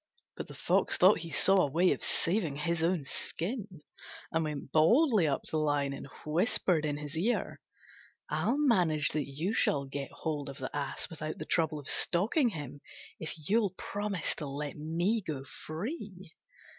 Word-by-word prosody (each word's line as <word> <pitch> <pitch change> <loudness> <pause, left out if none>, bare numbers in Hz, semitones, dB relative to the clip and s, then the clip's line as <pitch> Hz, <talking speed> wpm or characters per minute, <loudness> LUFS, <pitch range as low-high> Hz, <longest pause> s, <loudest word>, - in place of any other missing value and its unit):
But - - -6
the - - -10
Fox - - +2
thought 185 +2 +6
he 165 0 -5
saw 195 +5 +3
a 145 - +1
way 175 +6 +3
of - - -1
saving 170 -5 +1
his 165 +3 -1
own 165 -3 +1
skin, 190 - -4 0.5
and 160 0 +1
went 150 -3 -4
boldly 215 - +5
up 140 - 0
to - - -8
the 155 - +1
Lion 145 -2 +1
and 140 - -7 0.2
whispered 165 0 +2
in 145 -1 -1
his 150 +1 -7
ear, 210 +10 -1 0.7
"I'll 255 - +1
manage 180 - +3
that 150 -1 -1
you 155 +9 -2
shall 140 -9 +2
get 140 0 -5
hold 150 -3 -3
of 135 - -8
the 130 +1 -5
Ass 145 -1 -3
without 155 -1 -5
the 155 - -6
trouble 160 -2 +1
of 145 -2 -8
stalking 225 - +2
him, 145 - -7 0.4
if 155 -1 -5
you'll 205 -3 +2
promise 205 -4 -2
to 150 - -4
let 145 +1 -4
me 170 +9 0
go 150 -7 -4
free." 190 - -7
160 Hz, 175 wpm, -31 LUFS, 145-190 Hz, 0.7 s, thought